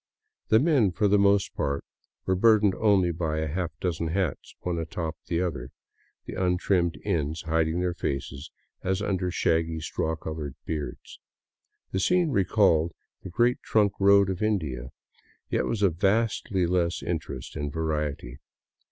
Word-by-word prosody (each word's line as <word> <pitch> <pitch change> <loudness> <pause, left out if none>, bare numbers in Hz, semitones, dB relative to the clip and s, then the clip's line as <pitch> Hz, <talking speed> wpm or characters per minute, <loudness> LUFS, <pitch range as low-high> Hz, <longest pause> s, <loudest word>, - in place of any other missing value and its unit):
The 110 - +5
men, 135 - +3
for 105 +4 +1
the 100 0 +4
most 100 0 +3
part, 70 0 -2 0.4
were 95 - +2
bur 110 +3 +5
dened 100 -2 +2
only 100 -5 +4
by 80 -2 -2
a 80 0 -1
half 85 +3 -2
dozen 85 -2 -1
hats, 85 -2 -2
one 90 -2 -2
atop 80 0 -4
the 85 +1 0
other, 65 -8 -4 0.6
the - - -7
untrimmed 90 -1 +1
ends 80 -5 -1
hiding 80 +1 0
their 90 -1 0
faces 70 -2 -4 0.3
as 95 +2 0
under 95 -3 -1
shaggy 80 -2 0
straw 80 +1 -2
colored 80 -3 -6
beards. 75 -6 -5 0.7
The 95 - -1
scene 180 - +2
recalled 95 - +3 0.3
the - - -8
Great 120 +7 +2
Trunk 105 -3 +2
Road 100 0 +5
of 95 - -5
India, 75 - -1 0.6
yet - - +1
was 105 -3 -1
of 85 -5 +2
vastly 100 -1 +1
less 85 -1 0
interest 75 -6 -4
and 75 -2 -3
variety. 75 -5 -3
90 Hz, 150 wpm, -27 LUFS, 80-100 Hz, 0.7 s, The